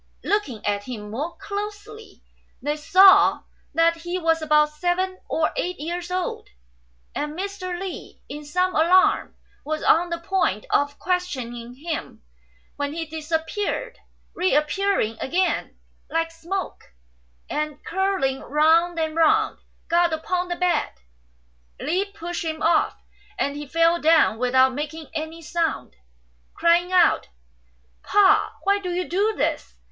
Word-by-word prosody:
Looking 285 Hz, -, -1 dB
at 205 Hz, 0 st, -1 dB
him 210 Hz, -4 st, -7 dB
more 295 Hz, +10 st, -4 dB
closely, 420 Hz, +2 st, -7 dB, 0.4 s
they 295 Hz, +2 st, -2 dB
saw 375 Hz, +6 st, +6 dB, 0.3 s
that 335 Hz, 0 st, +3 dB
he 345 Hz, +2 st, -4 dB
was 325 Hz, -2 st, +1 dB
about 300 Hz, -1 st, +4 dB
seven 360 Hz, +4 st, -1 dB
or 315 Hz, -1 st, +1 dB
eight 360 Hz, 0 st, -3 dB
years 345 Hz, +3 st, -4 dB
old, 365 Hz, 0 st, -3 dB, 0.6 s
and 300 Hz, +2 st, -4 dB
Mr. 370 Hz, -2 st, -4 dB
Li, 380 Hz, -1 st, -7 dB
in 295 Hz, +1 st, -7 dB
some 360 Hz, +5 st, 0 dB
alarm, 350 Hz, +4 st, +3 dB, 0.3 s
was 310 Hz, +1 st, -3 dB
on 345 Hz, +2 st, +4 dB
the 340 Hz, -, -2 dB
point 335 Hz, -, -1 dB
of 285 Hz, 0 st, +1 dB
questioning 250 Hz, -10 st, -3 dB
him, 315 Hz, -, -6 dB, 0.5 s
when 285 Hz, 0 st, -2 dB
he 330 Hz, 0 st, -3 dB
disappeared, 320 Hz, +10 st, -3 dB, 0.3 s
re 365 Hz, -4 st, +1 dB
appearing 300 Hz, -, +1 dB
again 360 Hz, +6 st, -1 dB, 0.3 s
like 330 Hz, 0 st, -1 dB
smoke, 330 Hz, -, -6 dB, 0.5 s
and, 300 Hz, -1 st, -4 dB
curling 380 Hz, -9 st, 0 dB
round 330 Hz, +3 st, +3 dB
and 315 Hz, -1 st, -1 dB
round, 420 Hz, +6 st, +3 dB, 0.3 s
got 340 Hz, 0 st, +3 dB
upon 355 Hz, +3 st, -1 dB
the 350 Hz, -, -2 dB
bed. 360 Hz, 0 st, 0 dB, 0.9 s
Li 375 Hz, +4 st, 0 dB
pushed 350 Hz, -3 st, -6 dB
him 315 Hz, -1 st, -4 dB
off, 405 Hz, +6 st, +2 dB, 0.4 s
and 280 Hz, 0 st, -1 dB
he 295 Hz, 0 st, -6 dB
fell 330 Hz, +3 st, +2 dB
down 315 Hz, -8 st, +4 dB
without 260 Hz, +1 st, +3 dB
making 300 Hz, +2 st, -6 dB
any 315 Hz, +2 st, -5 dB
sound, 330 Hz, -, -2 dB, 0.6 s
crying 345 Hz, +2 st, +3 dB
out, 365 Hz, -1 st, +4 dB, 0.7 s
"Pa! 405 Hz, -2 st, +3 dB
why 400 Hz, +1 st, +2 dB
do 370 Hz, -2 st, -5 dB
you 360 Hz, +1 st, -2 dB
do 410 Hz, +5 st, +1 dB
this -, -, -2 dB
335 Hz, 130 wpm, -23 LUFS, 300-370 Hz, 0.9 s, saw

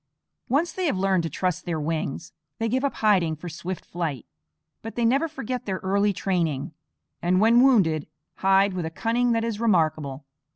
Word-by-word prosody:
Once 310 Hz, +7 st, +1 dB
they 370 Hz, -2 st, -1 dB
have 280 Hz, -, 0 dB
learned 190 Hz, -1 st, +2 dB
to 165 Hz, -, -3 dB
trust 180 Hz, +3 st, -2 dB
their 170 Hz, -2 st, -2 dB
wings, 155 Hz, +1 st, -3 dB, 0.2 s
they 225 Hz, -, -1 dB
give 260 Hz, +4 st, 0 dB
up 280 Hz, -, 0 dB
hiding 185 Hz, -7 st, +2 dB
for 155 Hz, +4 st, -9 dB
swift 175 Hz, +2 st, -6 dB
flight. 160 Hz, -8 st, -4 dB, 0.6 s
But 225 Hz, -, -8 dB
they 240 Hz, -, +1 dB
never 275 Hz, +8 st, +3 dB
forget 255 Hz, -5 st, -5 dB
their 190 Hz, -1 st, -1 dB
early 200 Hz, +2 st, +2 dB
training, 165 Hz, -8 st, -1 dB, 0.5 s
and 180 Hz, +2 st, +2 dB
when 230 Hz, +3 st, +5 dB
wounded 190 Hz, -, +3 dB, 0.3 s
hide 195 Hz, +1 st, +3 dB
with 175 Hz, -3 st, -3 dB
a -, -, -3 dB
cunning 235 Hz, +8 st, 0 dB
that 225 Hz, 0 st, +1 dB
is 230 Hz, -2 st, -3 dB
remarkable. 155 Hz, -, +1 dB
190 Hz, 180 wpm, -25 LUFS, 165-230 Hz, 0.6 s, when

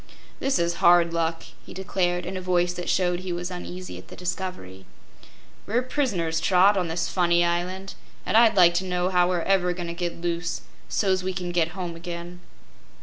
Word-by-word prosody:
"This 270 Hz, 0 st, +1 dB
is 170 Hz, 0 st, 0 dB
hard 170 Hz, -1 st, +5 dB
luck," 165 Hz, 0 st, -1 dB, 0.2 s
he -, -, -12 dB
declared, 180 Hz, -2 st, -1 dB
in 185 Hz, +2 st, -5 dB
a 185 Hz, -, -4 dB
voice 180 Hz, -1 st, +1 dB
that 180 Hz, 0 st, -5 dB
showed 180 Hz, -1 st, +1 dB
he 185 Hz, 0 st, -5 dB
was 175 Hz, +1 st, -4 dB
uneasy 180 Hz, 0 st, -7 dB
at -, -, -14 dB
the -, -, -11 dB
discovery. 180 Hz, -, -5 dB, 0.8 s
"We're 235 Hz, +4 st, +1 dB
pris'ners, 200 Hz, -, -1 dB
Trot, 190 Hz, +3 st, +5 dB
on 180 Hz, -3 st, 0 dB
this 165 Hz, +1 st, -1 dB
funny 175 Hz, -1 st, +2 dB
island, 180 Hz, +3 st, -2 dB, 0.3 s
an' -, -, -1 dB
I'd 225 Hz, -2 st, +6 dB
like 175 Hz, -2 st, +7 dB
to -, -, -6 dB
know 180 Hz, 0 st, -1 dB
how 180 Hz, -1 st, +3 dB
we're 175 Hz, -2 st, 0 dB
ever 180 Hz, -2 st, +2 dB
goin' 175 Hz, 0 st, -5 dB
to -, -, -4 dB
get 170 Hz, -1 st, -4 dB
loose, 170 Hz, 0 st, -2 dB, 0.3 s
so's 190 Hz, -3 st, +1 dB
we 185 Hz, 0 st, -3 dB
can 180 Hz, -1 st, -4 dB
get 170 Hz, +1 st, 0 dB
home 175 Hz, -2 st, -4 dB
again." 170 Hz, +1 st, -7 dB
180 Hz, 195 wpm, -25 LUFS, 170-185 Hz, 0.8 s, like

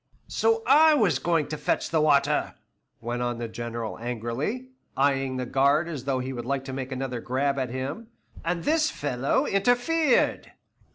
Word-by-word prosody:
"So 455 Hz, 0 st, +1 dB
I 310 Hz, +1 st, +6 dB
was 215 Hz, -10 st, +2 dB
going 165 Hz, -4 st, +1 dB
to 155 Hz, -, -4 dB
fetch -, -, -1 dB
the 160 Hz, -2 st, +2 dB
water," 145 Hz, -1 st, +2 dB, 0.5 s
went 120 Hz, +1 st, -3 dB
on 120 Hz, -1 st, -1 dB
the 120 Hz, 0 st, -4 dB
General 115 Hz, 0 st, -5 dB
angrily, 125 Hz, -, -3 dB, 0.3 s
eying 135 Hz, -1 st, +1 dB
the 125 Hz, -, -2 dB
guard 140 Hz, +6 st, +2 dB
as 145 Hz, -6 st, -6 dB
though 135 Hz, -2 st, 0 dB
he 130 Hz, +1 st, -4 dB
would 120 Hz, -2 st, -5 dB
like 135 Hz, +2 st, -2 dB
to 135 Hz, -, -6 dB
make 130 Hz, 0 st, -5 dB
another 130 Hz, -2 st, -3 dB
grab 140 Hz, +3 st, 0 dB
at 130 Hz, -2 st, -2 dB
him, 135 Hz, -, -5 dB, 0.4 s
"and 170 Hz, 0 st, -2 dB
this 310 Hz, +1 st, +2 dB
fellow 135 Hz, -2 st, -1 dB
interfered." 245 Hz, +8 st, +2 dB
140 Hz, 170 wpm, -26 LUFS, 125-175 Hz, 0.5 s, I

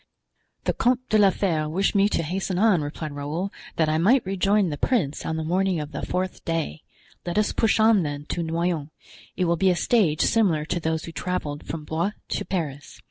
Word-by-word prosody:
"The -, -, +1 dB
Comte 255 Hz, +1 st, +1 dB
de 215 Hz, -, +4 dB
la 200 Hz, -1 st, +7 dB
Fere 165 Hz, -6 st, 0 dB
wished 190 Hz, +5 st, +1 dB
me 200 Hz, 0 st, +4 dB
to 170 Hz, -, 0 dB
hasten 185 Hz, +3 st, -2 dB
on," 200 Hz, -4 st, +4 dB
replied 150 Hz, +1 st, -5 dB
Raoul, 150 Hz, +7 st, -4 dB, 0.2 s
"that 160 Hz, -, +2 dB
I 155 Hz, +1 st, +1 dB
might 235 Hz, +9 st, +4 dB
rejoin 195 Hz, 0 st, +2 dB
the 145 Hz, -, -4 dB
prince 165 Hz, -, 0 dB
on 160 Hz, -, -1 dB
the 160 Hz, -, -2 dB
morning 185 Hz, +2 st, +1 dB
of 150 Hz, 0 st, -5 dB
the 145 Hz, -, -5 dB
fourth 185 Hz, 0 st, -3 dB
day; 165 Hz, -, -2 dB, 0.4 s
let 175 Hz, +2 st, -3 dB
us 210 Hz, 0 st, +2 dB
push 225 Hz, -1 st, +2 dB
on, 220 Hz, -2 st, +5 dB
then, 145 Hz, -2 st, -4 dB
to 175 Hz, -, -2 dB
Noyon; 165 Hz, -2 st, -1 dB, 0.5 s
it 185 Hz, -, +1 dB
will 170 Hz, 0 st, +1 dB
be 190 Hz, +3 st, +3 dB
a 180 Hz, -, +3 dB
stage 175 Hz, -5 st, +2 dB
similar 180 Hz, -10 st, +2 dB
to 175 Hz, -, -2 dB
those 160 Hz, -1 st, -2 dB
we 165 Hz, -, -8 dB
traveled 155 Hz, -2 st, -3 dB
from 155 Hz, -2 st, -5 dB
Blois 170 Hz, +7 st, -1 dB, 0.2 s
to -, -, -2 dB
Paris. 150 Hz, -7 st, -4 dB
170 Hz, 210 wpm, -24 LUFS, 155-195 Hz, 0.5 s, la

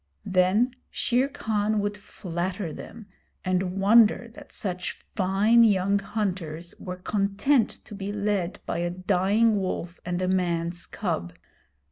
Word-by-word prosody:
Then 195 Hz, +6 st, +3 dB
Shere 250 Hz, +3 st, +1 dB
Khan 215 Hz, -6 st, 0 dB
would 205 Hz, 0 st, -1 dB
flatter 180 Hz, -3 st, -4 dB
them 225 Hz, +7 st, -10 dB, 0.4 s
and 185 Hz, +1 st, 0 dB
wonder 225 Hz, +3 st, +5 dB
that -, -, -13 dB
such 180 Hz, -3 st, -3 dB, 0.2 s
fine 205 Hz, +4 st, +4 dB
young 200 Hz, -2 st, +3 dB
hunters 180 Hz, -5 st, -3 dB
were 180 Hz, -1 st, -6 dB
content 205 Hz, +7 st, +1 dB
to -, -, -11 dB
be 200 Hz, 0 st, -4 dB
led 205 Hz, -3 st, -1 dB
by -, -, -2 dB
a 175 Hz, 0 st, 0 dB
dying 195 Hz, +5 st, +2 dB
wolf 180 Hz, -2 st, -3 dB
and 175 Hz, 0 st, -2 dB
a 185 Hz, -, 0 dB
man's 175 Hz, -2 st, -1 dB
cub. 90 Hz, -, -3 dB
195 Hz, 130 wpm, -26 LUFS, 180-210 Hz, 0.4 s, wonder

